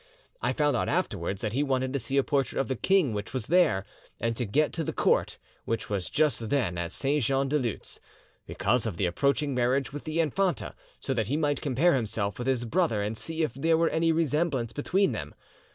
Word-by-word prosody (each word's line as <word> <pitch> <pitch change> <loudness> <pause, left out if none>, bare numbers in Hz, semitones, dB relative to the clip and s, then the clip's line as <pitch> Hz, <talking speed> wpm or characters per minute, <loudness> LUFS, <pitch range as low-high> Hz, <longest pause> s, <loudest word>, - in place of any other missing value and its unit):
I - - +1
found 145 -3 +1
out - - 0
afterwards 100 - -1
that 110 -1 -2
he 135 - +1
wanted 130 -2 0
to 140 - 0
see 135 +3 -2
a 140 - +4
portrait 135 -1 0
of 135 - 0
the 130 - 0
king 180 - +2
which 105 +2 -5
was 130 -5 -3
there, 170 - +3 0.3
and 115 0 -1
to 120 -1 -2
get 150 +9 +1
to 165 - -2
the - - -3
court, - - +1 0.3
which 115 -2 -3
was 95 -3 -1
just 145 -7 +1
then 120 -12 +1
at 85 0 -3
Saint 140 +6 0
Jean 135 +3 +1
de 150 +2 +1
Luz, 120 -5 -4 0.5
because 120 -1 0
of 95 -7 -4
the 100 - +1
approaching 140 - +1
marriage 125 +2 +1
with 145 - -7
the 155 +1 -2
infanta; 170 +2 0 0.3
so 135 - -2
that 110 -5 -1
he 140 +5 0
might 145 -2 0
compare 150 +5 +3
himself 105 -4 -2
with 120 - -3
his 125 -2 +1
brother 130 - +1
and 105 +2 -2
see 160 +7 -3
if 150 - -1
there 160 +5 +2
were 165 0 +3
any 165 0 +2
resemblance 150 -6 0
between 190 +7 +1
them. - - -5
135 Hz, 220 wpm, -28 LUFS, 115-155 Hz, 0.5 s, a